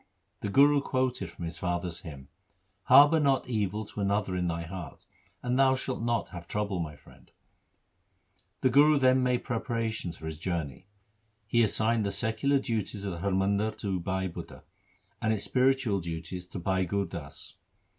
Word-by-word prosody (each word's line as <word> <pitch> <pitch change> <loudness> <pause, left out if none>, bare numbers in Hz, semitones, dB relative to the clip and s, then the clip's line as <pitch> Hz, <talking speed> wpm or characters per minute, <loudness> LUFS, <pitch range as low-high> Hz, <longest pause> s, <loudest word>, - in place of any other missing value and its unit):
The 105 - -3
Guru 145 +6 +5
quoted 130 -9 -1
from 85 - -7
his 80 -1 -6
father's 90 -1 -2
hymn: 70 -5 -10 0.3
— 95 +1 -45
Harbour 145 +3 +7
not 140 -3 +2
evil 105 -2 -1
to 105 - -7
another 100 -1 0
in 90 -1 0
thy 85 0 -2
heart, 85 -4 -8 0.4
And 125 +1 0
thou 130 -1 +5
shalt 130 -1 -4
not 120 0 0
have 85 -2 -9
trouble, 105 -2 -2
my 75 -3 -4
friend. 75 - -19
3 - - -36 1.3
The 130 - +4
Guru 145 +3 +6
then 130 -1 +4
made 125 -1 +1
preparations 115 -6 -3
for 80 - -10
his 80 -1 -5
journey. 85 -3 -4 0.6
He 120 +2 +2
assigned 110 +1 +2
the 100 - -1
secular 120 +7 +1
duties 110 -6 -3
of 100 - -2
the 85 - -6
Har 100 +3 -1
Mandar 100 +3 +1
4 - - -22
to 95 -3 -2
Bhai 95 +2 -2
Budha, 85 - -9 0.6
and 110 - +1
its 105 -2 0
spiritual 130 -5 +2
duties 85 +2 -6
to 95 - -8
Bhai 95 +1 0
Gur 100 +3 -1
Das. 85 -5 -8
100 Hz, 180 wpm, -29 LUFS, 90-125 Hz, 1.3 s, Harbour